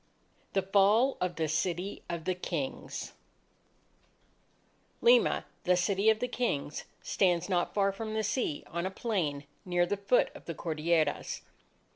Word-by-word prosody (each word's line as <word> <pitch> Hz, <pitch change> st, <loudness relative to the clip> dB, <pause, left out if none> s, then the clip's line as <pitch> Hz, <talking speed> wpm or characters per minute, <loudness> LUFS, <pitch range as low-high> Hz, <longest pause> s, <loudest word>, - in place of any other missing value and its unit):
THE 195 Hz, -, +2 dB
FALL 205 Hz, +7 st, +4 dB
OF 180 Hz, -1 st, -1 dB
THE 160 Hz, -1 st, 0 dB
CITY 175 Hz, +5 st, -1 dB
OF 170 Hz, -2 st, -4 dB
THE 185 Hz, -, +1 dB
KINGS 170 Hz, -6 st, -4 dB, 1.9 s
Lima, 485 Hz, +1 st, +4 dB, 0.2 s
"the 180 Hz, 0 st, +4 dB
City 195 Hz, +4 st, +2 dB
of 220 Hz, -, +4 dB
the 250 Hz, +3 st, -1 dB
Kings," 235 Hz, -, -2 dB, 0.2 s
stands 180 Hz, -3 st, +2 dB
not 180 Hz, -3 st, 0 dB
far 200 Hz, -1 st, +3 dB
from 215 Hz, +2 st, -5 dB
the 220 Hz, -, 0 dB
sea 205 Hz, -, -1 dB
on 170 Hz, +2 st, -3 dB
a -, -, -2 dB
plain 175 Hz, -9 st, -2 dB, 0.2 s
near 175 Hz, -1 st, +2 dB
the 200 Hz, +3 st, -1 dB
foot 200 Hz, +5 st, +2 dB
of -, -, -12 dB
the 165 Hz, -, -5 dB
Cordilleras. 160 Hz, 0 st, 0 dB
185 Hz, 145 wpm, -30 LUFS, 170-205 Hz, 1.9 s, FALL